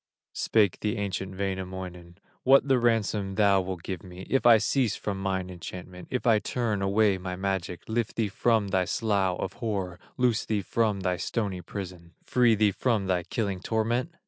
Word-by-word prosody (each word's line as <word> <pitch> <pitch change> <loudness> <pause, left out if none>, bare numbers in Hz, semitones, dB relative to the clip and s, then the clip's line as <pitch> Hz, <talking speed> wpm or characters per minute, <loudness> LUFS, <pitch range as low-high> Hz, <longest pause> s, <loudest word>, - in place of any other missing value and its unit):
Spake 105 -5 +2
the 105 +2 -1
ancient 95 -1 -3
Wainamoinen: 95 -2 -5 0.2
"What 135 +2 +5
the 135 -2 +4
ransom 105 -4 +1
thou 100 -2 +4
wilt 90 -2 -5
give 95 -4 -4
me 90 0 -10
If 135 -2 +3
I 115 -2 +9
cease 115 +2 +1
from 100 -2 -4
mine 95 -1 -2
enchantment, 90 0 -9
If 125 - -2
I 115 -3 +5
turn 110 -3 -1
away 100 0 +3
my 90 0 -4
magic, 95 -2 -2
Lift 115 0 -1
thee 110 -2 +1
from 110 0 +1
thy 95 -2 +2
slough 100 -3 0
of 95 - -3
horror, 95 -6 -2 0.2
Loose 125 -3 +2
thee 105 -3 -1
from 105 0 0
thy 90 -1 0
stony 95 0 -2
prison, 90 -2 -8
Free 120 -3 +4
thee 105 -1 +3
from 110 -1 0
thy 90 -2 +1
killing 100 +1 -2
torment?" 115 - 0
100 Hz, 175 wpm, -27 LUFS, 95-110 Hz, 0.2 s, I